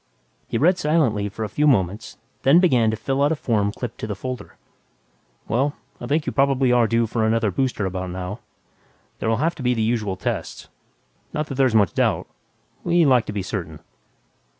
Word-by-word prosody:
He - - -2
read 180 +5 +3
silently 135 -11 +1
for 110 +2 -6
a - - -2
few 150 +9 +1
moments, 105 -5 0 0.2
then 140 +6 +6
began 125 -11 +3
to 110 - -2
fill 135 +5 -1
out 145 +2 +3
a - - +2
form 105 -8 0
clipped 120 +1 -7
to - - -4
the 105 - -3
folder. 125 +6 -7 0.9
"Well, 135 +5 0 0.2
I 120 - -6
think 150 +3 0
you - - -2
probably 135 -2 +2
are 120 -2 +4
due 115 +1 +2
for 110 0 -1
another 110 -1 +1
booster 125 -2 -1
about 95 0 -3
now. 90 +4 -5 0.8
There'll 110 0 0
have 165 +3 +1
to 150 - -10
be 125 -1 +1
the 110 - 0
usual 110 -4 0
tests. 95 - -4 0.6
Not 150 - -1
that - - -3
there's 130 -3 +2
much 100 -5 +3
doubt... - - +1 0.6
we 170 -1 +3
like 125 -5 +3
to - - -3
be 100 -2 -3
certain." 85 -7 -5
115 Hz, 195 wpm, -22 LUFS, 105-135 Hz, 0.9 s, then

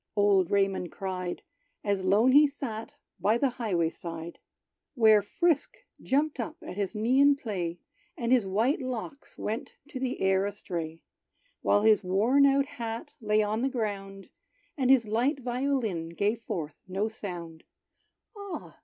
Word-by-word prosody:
old 200 -3 +4
Raymond 195 -3 +1
cried, 185 -2 -4 0.4
As 200 -2 0
lone 210 +7 +4
he 295 +2 +7
sat 230 -6 -6 0.2
by 215 +3 +3
the 270 +1 +1
highway 175 -7 +1
side, 165 0 -8 0.6
Where 220 -4 +6
Frisk 310 - 0 0.2
jumped 290 +3 0
up 315 +1 -4
at - - -7
his 200 +1 -2
knee 235 +5 +2
in 285 0 +6
play; 185 -10 -4 0.4
And 235 -4 -1
his 255 -3 +5
white 230 +10 +1
locks 255 +3 -6
went 220 +2 -4
to 260 - -6
the 255 -1 -2
air 190 +1 +2
astray; 170 -5 -5 0.6
While 205 - +3
his 215 -2 +5
worn 225 +10 +4
out 275 0 +3
hat 230 -3 -6
lay 215 0 +2
on 215 +2 -1
the 265 - +1
ground, 195 -5 -4 0.5
And 260 -4 0
his 260 -4 +6
light 245 +7 +1
violin 245 -9 -1
gave 205 +7 -1
forth 155 -8 -4
no 195 +3 -1
sound 175 -7 -7 0.7
"Ah! 405 -2 -8
215 Hz, 150 wpm, -28 LUFS, 190-255 Hz, 0.7 s, he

